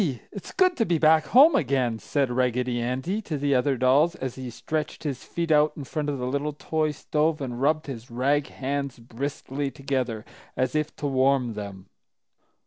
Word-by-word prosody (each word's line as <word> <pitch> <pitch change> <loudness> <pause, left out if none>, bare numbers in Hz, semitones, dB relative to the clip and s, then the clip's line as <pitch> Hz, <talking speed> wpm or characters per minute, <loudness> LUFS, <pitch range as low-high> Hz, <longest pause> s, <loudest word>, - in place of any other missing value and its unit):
It's 200 - -8
good 370 -1 +3
to 225 - +2
be 170 -1 +2
back 155 0 +5
home 290 +6 +7
again!" 130 - +1
said 140 0 0
Raggedy 125 -1 0
Andy 130 - -2
to 160 -8 -4
the 140 0 +1
other 130 +1 +2
dolls, 140 +7 +4
as 130 -6 -4
he 130 -1 -7
stretched 155 +7 -4
his 140 -5 -3
feet 170 -1 -3
out 150 0 +4
in 145 - -5
front 150 +2 -3
of 140 - -2
the 125 - -3
little 140 +3 -1
toy 155 +1 -1
stove 150 +1 0
and 125 -3 -4
rubbed 155 +2 +2
his 125 -4 -7
rag 140 +4 +1
hands 140 0 -3
briskly 135 +3 -4
together, 130 -5 -3 0.3
as 130 -1 0
if 155 0 -1
to 150 - -6
warm 130 -3 +2
them. 100 -3 -7
140 Hz, 185 wpm, -26 LUFS, 125-155 Hz, 0.3 s, home